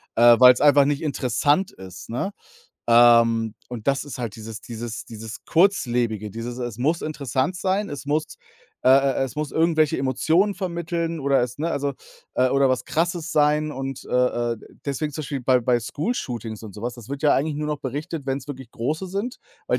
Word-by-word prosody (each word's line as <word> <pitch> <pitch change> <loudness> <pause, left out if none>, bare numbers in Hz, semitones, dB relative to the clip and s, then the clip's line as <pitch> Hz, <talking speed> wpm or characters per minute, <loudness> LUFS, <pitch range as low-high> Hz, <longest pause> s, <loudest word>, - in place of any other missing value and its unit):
äh, 120 0 +7
weil's 125 -1 +8
einfach 145 -1 +6
nicht 145 +1 -1
interessant 145 +4 +1
ist, 95 -1 -11
ne? 125 - -2 0.6
Ähm, 115 -2 +5 0.2
und 120 -3 -7
das 140 0 +1
ist 140 -3 -8
halt 115 -5 -4
dieses 110 0 -8
dieses 115 0 -7
dieses 110 0 -8
Kurzlebige, 120 - +1
dieses: 115 +4 -6
„Es 120 -3 -4
muss 155 +8 0
interessant 150 +3 -2
sein. 195 +2 0
Es 145 -1 -6
muss, 155 +2 -1 0.5
äh, - - +3
äh, 135 0 +4
äh - - +3
es 130 - -7
muss 150 -1 -2
irgendwelche 160 -2 +2
Emotionen 160 +10 +2
vermitteln 170 -3 -3
oder 135 -2 +2
es 125 +2 -4
ne, 160 +3 -1
also, 140 0 -1 0.4
äh 130 - +3
oder 135 +1 +3
was 130 - 0
Krasses 170 0 -1
sein.“ 150 0 +2
Und, 135 -1 -5
äh, - - -9 0.4
äh, - - -5 0.3
deswegen 150 +2 -2
zum 155 - -5
Beispiel 140 -1 -4
bei 125 0 +3
bei 120 +1 +2
School-Shootings 120 - -4
und 110 -3 -9
so 105 - -9
was, 120 0 -3
das 120 0 -12
wird 140 0 -5
ja 150 - +5
eigentlich 150 +2 0
nur 150 0 -3
noch 150 -1 -2
berichtet, 145 +4 -5
wenn's 135 +1 -2
wirklich 130 -4 -8
große 150 +12 -3
sind, 200 +7 -3 0.3
weil - - +1
135 Hz, 195 wpm, -23 LUFS, 120-155 Hz, 0.6 s, weil's